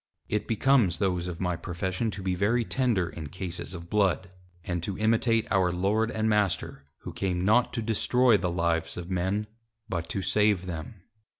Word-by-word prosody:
It 105 Hz, -, -2 dB
becomes 115 Hz, -5 st, +3 dB
those 90 Hz, -3 st, 0 dB
of 90 Hz, -2 st, -5 dB
my 90 Hz, -2 st, 0 dB
Profession 95 Hz, +5 st, -2 dB
to 100 Hz, -2 st, -6 dB
be 95 Hz, -1 st, 0 dB
very 110 Hz, +6 st, +1 dB
tender 115 Hz, -10 st, +1 dB
in 80 Hz, -3 st, -7 dB
Cases 90 Hz, +2 st, -6 dB
of 85 Hz, -1 st, -8 dB
Blood, 95 Hz, -2 st, +1 dB, 0.3 s
and 85 Hz, -1 st, -2 dB
to 95 Hz, +3 st, -4 dB
imitate 115 Hz, +1 st, +2 dB
our 95 Hz, -3 st, +3 dB
Lord 100 Hz, +5 st, +1 dB
and 110 Hz, 0 st, -1 dB
Master, 105 Hz, -9 st, 0 dB, 0.2 s
Who -, -, -7 dB
came 90 Hz, -2 st, -1 dB
not 110 Hz, +5 st, +4 dB
to 115 Hz, -, -2 dB
destroy 120 Hz, +2 st, +3 dB
the 90 Hz, -3 st, 0 dB
Lives 85 Hz, -1 st, -1 dB
of 90 Hz, +1 st, -6 dB
Men, 95 Hz, +4 st, 0 dB, 0.4 s
but 85 Hz, -5 st, -3 dB
to 95 Hz, -, -2 dB
save 105 Hz, -1 st, +2 dB
them. 90 Hz, +2 st, -7 dB
95 Hz, 180 wpm, -28 LUFS, 90-110 Hz, 0.4 s, not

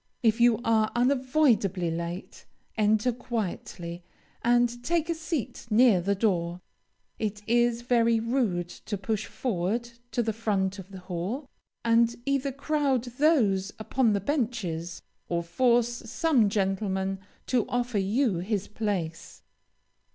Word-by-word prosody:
If 225 Hz, 0 st, +3 dB
you 235 Hz, -2 st, +5 dB
are 220 Hz, -1 st, +2 dB
unavoidably 245 Hz, -, +2 dB
late, 170 Hz, +2 st, -6 dB, 0.3 s
enter 215 Hz, +2 st, +3 dB
quietly, 185 Hz, -7 st, -5 dB, 0.4 s
and 240 Hz, 0 st, +2 dB
take 335 Hz, +2 st, 0 dB
a -, -, +2 dB
seat 320 Hz, -, -4 dB
near 220 Hz, -4 st, +5 dB
the 200 Hz, +3 st, +1 dB
door. 180 Hz, -4 st, 0 dB, 0.6 s
It 210 Hz, -1 st, -3 dB
is 240 Hz, 0 st, +2 dB
very 235 Hz, -2 st, +3 dB
rude 225 Hz, -7 st, 0 dB
to 205 Hz, +3 st, -6 dB
push 210 Hz, +2 st, -2 dB
forward 230 Hz, +1 st, -2 dB, 0.2 s
to 240 Hz, -, 0 dB
the 220 Hz, -1 st, -1 dB
front 200 Hz, -3 st, -1 dB
of 190 Hz, 0 st, -10 dB
the 190 Hz, -2 st, -10 dB
hall, 185 Hz, -, -4 dB, 0.4 s
and 230 Hz, 0 st, +4 dB
either 275 Hz, 0 st, 0 dB
crowd 280 Hz, -2 st, 0 dB, 0.2 s
those 210 Hz, -, +3 dB
upon 225 Hz, +1 st, +1 dB
the 200 Hz, -, +1 dB
benches, 195 Hz, -, -2 dB, 0.3 s
or 170 Hz, 0 st, 0 dB
force 240 Hz, +5 st, +2 dB
some 260 Hz, -5 st, +3 dB
gentleman 195 Hz, -1 st, -1 dB, 0.3 s
to 250 Hz, -3 st, +1 dB
offer 245 Hz, -3 st, 0 dB
you 205 Hz, +1 st, +1 dB
his 200 Hz, +2 st, -2 dB
place. 195 Hz, -7 st, -4 dB
220 Hz, 130 wpm, -27 LUFS, 195-245 Hz, 0.6 s, you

